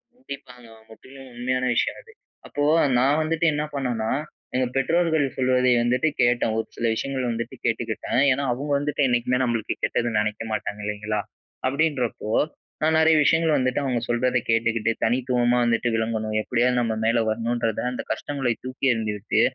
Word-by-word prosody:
கண்டிப்பாங்க. 130 Hz, -, -11 dB, 0.2 s
முற்றிலும் 130 Hz, +4 st, -13 dB
உண்மையான 130 Hz, +1 st, -1 dB
விஷயம் -, -, 0 dB
அது. 460 Hz, -, -18 dB, 0.4 s
அப்போ 145 Hz, -, -2 dB, 0.3 s
நான் 140 Hz, +5 st, +3 dB
வந்துட்டு 160 Hz, +1 st, 0 dB
என்ன 150 Hz, +1 st, -1 dB
பண்ணன்னா, 120 Hz, -5 st, -1 dB, 0.4 s
எங்க 130 Hz, -, +2 dB
பெற்றோர்கள் 160 Hz, +2 st, +2 dB
சொல்வதை 125 Hz, -1 st, +3 dB
வந்துட்டு 125 Hz, +5 st, +2 dB
கேட்டேன். 120 Hz, -2 st, +2 dB
ஒரு 110 Hz, -, -2 dB
சில 115 Hz, -, -3 dB
விஷயங்கள் 130 Hz, +1 st, -2 dB
வந்துட்டு 115 Hz, 0 st, -4 dB
கேட்டுக்கிட்டேன். 130 Hz, -, 0 dB
ஏன்னா 140 Hz, +2 st, 0 dB
அவங்க 140 Hz, +4 st, -4 dB
வந்துட்டு, 145 Hz, 0 st, 0 dB
என்னைக்குமே 125 Hz, +1 st, +1 dB
நம்பளுக்கு 115 Hz, -3 st, -1 dB
கெட்டது 120 Hz, -2 st, 0 dB
நெனைக்க 105 Hz, +1 st, -2 dB
மாட்டாங்க, 105 Hz, -1 st, -3 dB
இல்லைங்களா? 105 Hz, 0 st, -2 dB, 0.5 s
அப்படின்றப்போ, 135 Hz, -6 st, -1 dB, 0.5 s
நான் 160 Hz, 0 st, +3 dB
நெறைய 160 Hz, 0 st, +5 dB
விஷயங்கள் 160 Hz, 0 st, +3 dB
வந்துட்டு 130 Hz, +1 st, 0 dB
அவங்க 125 Hz, -3 st, 0 dB
சொல்றத 125 Hz, +1 st, +1 dB
கேட்டுக்கிட்டு, 115 Hz, -1 st, +2 dB
தனித்துவமா 125 Hz, 0 st, +2 dB
வந்துட்டு 120 Hz, +1 st, +1 dB
விளங்கணும். 110 Hz, -1 st, -1 dB
எப்படியாவது 125 Hz, +2 st, +1 dB
நம்ம 115 Hz, -1 st, 0 dB
மேலே 115 Hz, +1 st, +3 dB
வரணும்ன்றத 115 Hz, 0 st, -1 dB
அந்த -, -, -4 dB
கஷ்டங்களைத் 135 Hz, -5 st, -2 dB
தூக்கியெறிந்து 120 Hz, -5 st, 0 dB
விட்டு, 100 Hz, -, +1 dB
125 Hz, 145 wpm, -24 LUFS, 115-135 Hz, 0.5 s, நெறைய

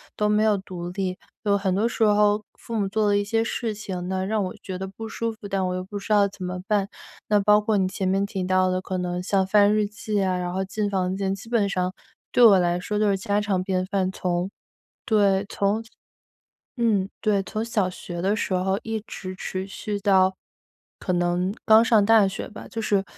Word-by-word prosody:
都 210 Hz, -, +1 dB
没 210 Hz, 0 st, +3 dB
有 210 Hz, -2 st, +3 dB
独 180 Hz, -2 st, -7 dB
立， 185 Hz, 0 st, -3 dB, 0.3 s
有 205 Hz, -1 st, +3 dB
很 190 Hz, -2 st, 0 dB
多 215 Hz, +4 st, +2 dB
时 225 Hz, -, -1 dB
候 210 Hz, 0 st, +3 dB
父 230 Hz, -, -7 dB
母 205 Hz, -3 st, +1 dB
做 215 Hz, +2 st, 0 dB
了 205 Hz, -1 st, +3 dB
一 205 Hz, -, +2 dB
些 225 Hz, +2 st, 0 dB
事 230 Hz, -1 st, -3 dB
情 185 Hz, -4 st, -5 dB
呢， 190 Hz, 0 st, -1 dB
让 215 Hz, 0 st, 0 dB
我 185 Hz, -, -5 dB
觉 190 Hz, -, -5 dB
得 190 Hz, +1 st, -4 dB
不 220 Hz, +4 st, -8 dB
舒 230 Hz, +1 st, -3 dB
服， 215 Hz, -2 st, -10 dB
但 195 Hz, -1 st, -1 dB
我 180 Hz, -, -2 dB
又 185 Hz, -, -3 dB
不 200 Hz, +2 st, -6 dB
知 205 Hz, -, -7 dB
道 205 Hz, -1 st, +5 dB
怎 195 Hz, -1 st, -10 dB
么 180 Hz, 0 st, -4 dB
办。 205 Hz, -2 st, +1 dB, 0.4 s
那 210 Hz, -1 st, +3 dB
包 210 Hz, +1 st, +5 dB
括 210 Hz, 0 st, +1 dB
你 190 Hz, -1 st, +2 dB
前 190 Hz, 0 st, -3 dB
面 195 Hz, +1 st, +1 dB
提 195 Hz, -2 st, -4 dB
到 185 Hz, 0 st, +2 dB
的， 185 Hz, 0 st, -1 dB
可 185 Hz, 0 st, -4 dB
能 180 Hz, 0 st, -2 dB
像 190 Hz, 0 st, +1 dB
翻 205 Hz, +1 st, +4 dB
日 215 Hz, -1 st, +2 dB
记 215 Hz, 0 st, -3 dB
啊， 185 Hz, -1 st, +1 dB
然 180 Hz, 0 st, -2 dB
后 190 Hz, +1 st, -2 dB
进 205 Hz, +1 st, -2 dB
房 185 Hz, -1 st, -1 dB
间， 195 Hz, 0 st, -1 dB
基 200 Hz, -, -12 dB
本 225 Hz, -4 st, +1 dB
上 185 Hz, -1 st, -1 dB, 0.4 s
对 245 Hz, -, +4 dB
我 205 Hz, -4 st, +8 dB
来 175 Hz, 0 st, +1 dB
说 210 Hz, +3 st, -3 dB
都 210 Hz, 0 st, +2 dB
是 195 Hz, -1 st, +2 dB
家 205 Hz, +2 st, 0 dB
常 200 Hz, -3 st, 0 dB
便 185 Hz, -1 st, -1 dB
饭。 190 Hz, -1 st, -1 dB
从 180 Hz, -1 st, -1 dB
对， -, -, -11 dB, 2.1 s
从 225 Hz, -6 st, 0 dB
嗯， 195 Hz, -, -8 dB
对， 205 Hz, -3 st, +1 dB
从 215 Hz, +4 st, -3 dB
小 210 Hz, -5 st, 0 dB
学 175 Hz, -1 st, -7 dB
的 195 Hz, +2 st, +2 dB
时 190 Hz, -, -2 dB
候 190 Hz, +2 st, 0 dB
一 220 Hz, -2 st, -3 dB
直 185 Hz, -2 st, -7 dB
持 190 Hz, 0 st, -4 dB
续 205 Hz, +1 st, -4 dB
到， 190 Hz, -1 st, +4 dB, 0.6 s
可 -, -, -3 dB
能 175 Hz, +2 st, 0 dB
刚 220 Hz, 0 st, +7 dB
上 220 Hz, -3 st, +4 dB
大 225 Hz, -1 st, +6 dB
学 195 Hz, 0 st, -4 dB
吧。 215 Hz, -, -10 dB
就 225 Hz, -, -4 dB
是， 200 Hz, -2 st, +1 dB
195 Hz, 245 characters per minute, -24 LUFS, 185-210 Hz, 2.1 s, 我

